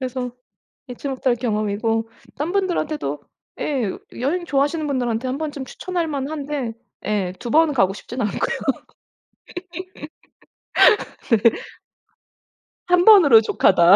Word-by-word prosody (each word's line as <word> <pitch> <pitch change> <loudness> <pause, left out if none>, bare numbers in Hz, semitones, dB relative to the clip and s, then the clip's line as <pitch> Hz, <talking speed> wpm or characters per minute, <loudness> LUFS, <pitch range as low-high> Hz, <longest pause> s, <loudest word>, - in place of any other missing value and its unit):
그래서 255 -1 -4 0.6
잊지 250 +3 -6
못할 260 -2 0
경험이고 225 0 -1 0.3
딴 300 +5 -2
분들한테도 310 - -1 0.4
예 255 -9 -1 0.3
여행 345 +7 -1
좋아하시는 295 +3 0
분들한테 250 -3 -1
한 260 - -2
번쯤 295 -3 -4
추천할 350 +4 -3
만한데 285 -3 -3 0.3
예 200 -4 0
2 235 - -6
번은 315 0 +4
가고 195 -6 +3
싶진 245 +5 -7
않고요. 215 +5 -1 2.8
네. 230 - +4 1.3
1 355 0 +4
번으로 330 - +8
족하다. 185 -4 +5
265 Hz, 235 characters per minute, -21 LUFS, 225-300 Hz, 2.8 s, 번으로